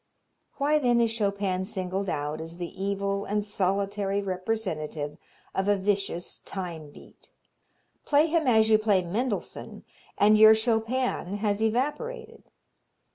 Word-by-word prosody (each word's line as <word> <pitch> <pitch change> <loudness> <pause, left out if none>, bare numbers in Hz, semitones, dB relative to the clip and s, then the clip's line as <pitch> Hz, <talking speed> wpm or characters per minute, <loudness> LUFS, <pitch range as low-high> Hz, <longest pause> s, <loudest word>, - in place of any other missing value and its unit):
Why 295 +2 +2
then 245 -4 +3
is 230 -1 +2
Chopin 200 -4 -1
singled 190 -1 -3
out 150 +1 -3
as 165 +1 -6
the 175 +2 -6
evil 200 0 -1
and 210 0 -1
solitary 200 0 0
representative 185 -7 -3 0.4
of 190 +1 -1
a 205 - +4
vicious 195 -3 -2
time 170 -6 -6
beat? - - -17 0.7
Play 295 +1 +4
him 325 -2 +1
as 220 -3 +5
you 215 -1 +5
play 205 -4 +2
Mendelssohn 210 +6 -4 0.3
and 215 +1 +5
your 220 0 +9
Chopin 225 -3 -1
has 205 0 -1
evaporated. 450 - -2
205 Hz, 130 wpm, -27 LUFS, 190-225 Hz, 0.7 s, your